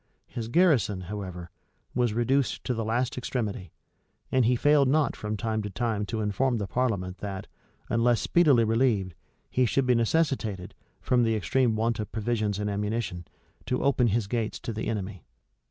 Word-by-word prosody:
His 115 -2 -6
garrison, 125 - +3
however, 90 -3 -6 0.4
was 120 -3 +1
reduced 130 +3 +1
to 125 - -1
the 115 -1 -2
last 120 +3 -1
extremity; 110 -7 -3 0.6
and 130 -2 +3
he 125 +2 +3
failed 145 +2 +4
not 150 +2 +2
from 105 0 -4
time 110 0 -1
to 105 - -4
time 105 0 -2
to 110 -1 -2
inform 115 +5 +1
the 105 - -2
parliament 95 -5 -1
that, 95 -2 -5 0.4
unless 120 0 +2
speedily 145 -9 +4
relieved, 110 -5 +1 0.4
he 125 -1 +2
should 135 +3 +1
be 125 - +4
necessitated, 115 - 0 0.3
from 125 -1 +2
the 115 -1 +2
extreme 110 +4 +1
want 115 +1 0
of 105 - -4
provisions 110 -2 -1
and 105 0 -2
ammunition, 105 -4 -3 0.4
to 125 - 0
open 130 -3 +3
his 115 0 +1
gates 110 +1 -2
to 115 - -4
the 110 - -4
enemy. 100 -5 -4
115 Hz, 170 wpm, -27 LUFS, 105-125 Hz, 0.6 s, failed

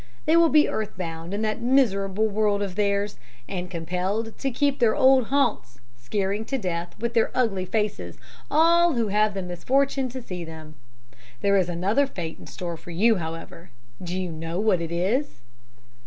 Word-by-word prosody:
They 315 - +4
will 335 -1 +6
be 300 0 +5
earth 215 -1 -3
bound 165 -1 -5
in 205 +2 -2
that 215 -1 -1
miserable 220 -5 +2
world 205 -1 +1
of 195 -2 -4
theirs, 200 -1 0 0.3
and 180 -2 -4
compelled 185 +6 -3
to 275 - 0
keep 280 +2 +1
to - - -26
their 230 -3 +3
old 260 -2 +5
haunts, 225 - 0 0.2
scaring 195 - -2
to 270 - -2
death 175 -5 -4
with 235 +1 -2
their 230 -1 +3
ugly 205 -7 +1
faces 210 +2 -2 0.3
all 335 +2 +5
who 230 -4 0
have 210 0 +2
the 195 - -3
misfortune 260 +9 0
to 260 +2 -6
see 180 -8 -6
them. 160 -1 -10 0.7
There 200 0 +3
is 185 -3 +2
another 200 +11 +1
fate 170 -9 -6
in - - -12
store 170 -2 -5
for 175 - -13
you, 210 +6 +3
however. 165 +1 -7 0.3
Do 180 +1 -3
you 180 -2 -3
know 165 +2 -4
what 205 -5 +2
it 165 0 -4
is?' 195 - -1
200 Hz, 185 wpm, -25 LUFS, 175-235 Hz, 0.7 s, will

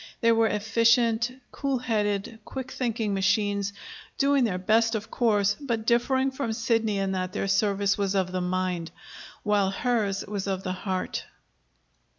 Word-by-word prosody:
They 230 -1 +5
were 225 0 +4
efficient, 230 +2 +2 0.2
cool 275 -2 -1
headed, 215 -2 -1
quick 260 +2 -6
thinking 225 -4 -1
machines, 200 +1 +1 0.5
doing 275 -2 +3
their 190 -5 -1
best, 225 +5 +2
of 220 +1 -5
course, 205 -4 +2
but 235 -6 -2
differing 260 +3 +2
from 260 -4 -3
Sidney 225 -2 +1
in 195 -1 0
that 185 -1 -2
their - - -2
service 200 0 +1
was 200 -1 0
of 185 -2 +1
the 185 0 -2
mind, 180 -2 -1 0.5
while 205 -2 +2
hers 205 -2 0
was 200 -1 -4
of 190 -1 -2
the 185 - -2
heart. 185 0 -3
210 Hz, 155 wpm, -26 LUFS, 195-230 Hz, 0.5 s, They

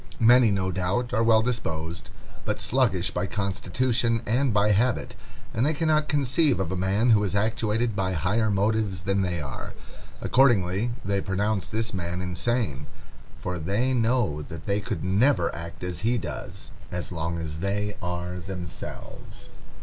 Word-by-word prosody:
Many, 120 0 +6
no 95 -2 0
doubt, 95 +7 -1
are 115 - +2
well 110 -1 +5
disposed, 80 - -3 0.3
but - - -2
sluggish 105 -8 +1
by 90 +2 -1
constitution 115 +5 0
and 125 +4 +2
by 105 0 +3
habit, 115 +5 +1 0.4
and 115 - +1
they 150 +3 +2
cannot 155 -1 +2
conceive 145 - +2
of 95 -3 -1
a - - -1
man 100 +6 +2
who 105 -2 +5
is 100 -1 -1
actuated 110 +1 0
by 95 -2 0
higher 100 +7 +1
motives 100 -2 +1
than 95 +1 +1
they 90 -2 -1
are. 70 -4 -6 0.5
Accordingly 110 -4 +3 0.2
they 100 0 +1
pronounce 100 0 -1
this 115 +4 -2
man 90 -1 -3
insane, 90 - -1 0.5
for 90 -1 -4
they 105 +11 0
know 115 - +1
that 80 +2 -8
they 100 0 +1
could 95 - -4
never 95 +1 +3
act 85 +1 -8
as 90 -3 -4
he 120 +2 +1
does, - - -6 0.2
as 90 +1 -4
long 85 0 -2
as 80 -1 -4
they 100 +2 -1
are 90 0 -3
themselves. 90 -2 -8
100 Hz, 155 wpm, -26 LUFS, 90-115 Hz, 0.5 s, Many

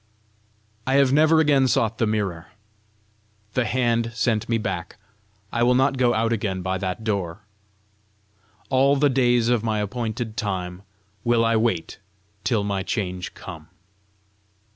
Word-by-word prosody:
I 135 - +2
have 140 -1 +4
never 155 +2 +5
again 145 -4 +4
sought 115 -2 +1
the 115 - +2
mirror. 100 -6 -2 1.1
The 125 -1 +1
hand 115 0 +1
sent 115 -1 0
me 115 - +2
back: 95 -6 -4 0.6
I 120 - 0
will 125 +1 +4
not 135 +2 +3
go 120 -1 +3
out 115 +1 +1
again 95 -4 -2
by 95 0 -1
that 95 +2 -3
door! 100 -4 -2 1.3
"All 135 +2 +4
the 145 0 +3
days 120 -3 +3
of 120 -3 +2
my 110 -2 0
appointed 110 +1 -3
time 95 -3 -3 0.4
will 120 -1 +3
I 115 0 +2
wait 110 -8 -1 0.4
till 105 -1 +1
my 100 -1 -1
change 90 -2 -3
come." 80 -4 -10
115 Hz, 140 wpm, -23 LUFS, 100-125 Hz, 1.3 s, never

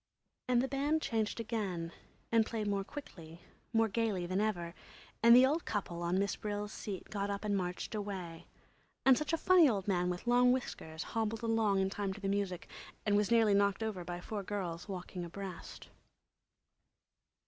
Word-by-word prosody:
And 250 -1 +3
the - - 0
band 285 +3 +1
changed 225 -6 -1
again 200 -7 -3 0.4
and 230 -1 +5
played 220 -1 -3
more 200 -1 0
quickly, 175 - -10 0.3
more 225 -1 +3
gayly 210 -4 0
than 185 +3 0
ever, 175 -6 -1 0.5
and 235 +1 +8
the 255 +1 +8
old 305 +5 +1
couple 180 -5 -3
on 175 +2 +1
Miss 200 0 +1
Brill's 210 0 -4
seat 195 -3 -6
got 200 -1 -2
up 200 +1 -3
and 205 -1 +1
marched 180 +3 -3
away, 190 -6 -5 0.6
and 265 -1 +8
such 300 +3 -2
a 330 - +2
funny 350 -2 +6
old 200 -4 -1
man 180 -2 +1
with 180 +4 -4
long 245 +1 +5
whiskers 165 -10 -3
hobbled 225 0 -2
along 220 -4 +2
in 190 0 0
time 200 -1 -2
to 205 - -10
the 200 - -3
music 195 -3 -1 0.4
and 205 -1 +3
was 205 0 +2
nearly 225 -3 +5
knocked 200 +1 +2
over 210 -5 -3
by 175 0 -5
four 205 +3 -4
girls 185 -3 -4
walking 180 -1 -5
abreast. 185 +1 -8
205 Hz, 180 wpm, -33 LUFS, 185-225 Hz, 0.6 s, and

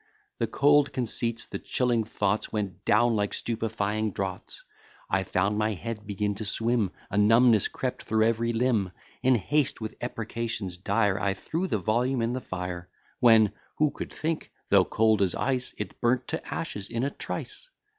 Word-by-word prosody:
The - - +1
cold 145 0 +4
conceits, 115 -2 0
the - - -6
chilling 120 -3 +1
thoughts, 105 -1 -1
Went 100 -3 -4
down 120 +2 +4
like 105 -1 0
stupifying 110 -2 -1
draughts; 95 -1 -5 0.5
I 95 - +3
found 100 +3 0
my 105 0 +1
head 110 +1 -6
begin 105 0 -1
to 110 - -4
swim, 115 0 +1 0.2
A 100 - +1
numbness 115 0 +5
crept 130 -1 -4
through 110 0 +2
every 115 +1 +1
limb. 115 -6 +1 0.3
In 130 0 +4
haste, 145 +7 +1
with 110 -1 -5
imprecations 115 -5 -3
dire, 100 +1 +1
I 95 0 0
threw 165 - -3
the 110 - 0
volume 120 +5 +1
in 115 +1 0
the 130 - -3
fire; 90 -3 -5 0.3
When, 110 -4 +6 0.3
(who 150 -1 +3
could - - -7
think?) 160 0 -3 0.2
though - - +6
cold 110 -2 +2
as 95 -3 +2
ice, 130 -2 -1
It - - -6
burnt 120 +1 +2
to - - -3
ashes 100 -1 -4
in 115 +1 -2
a 140 - 0
trice. - - -6
110 Hz, 170 wpm, -27 LUFS, 100-120 Hz, 0.5 s, When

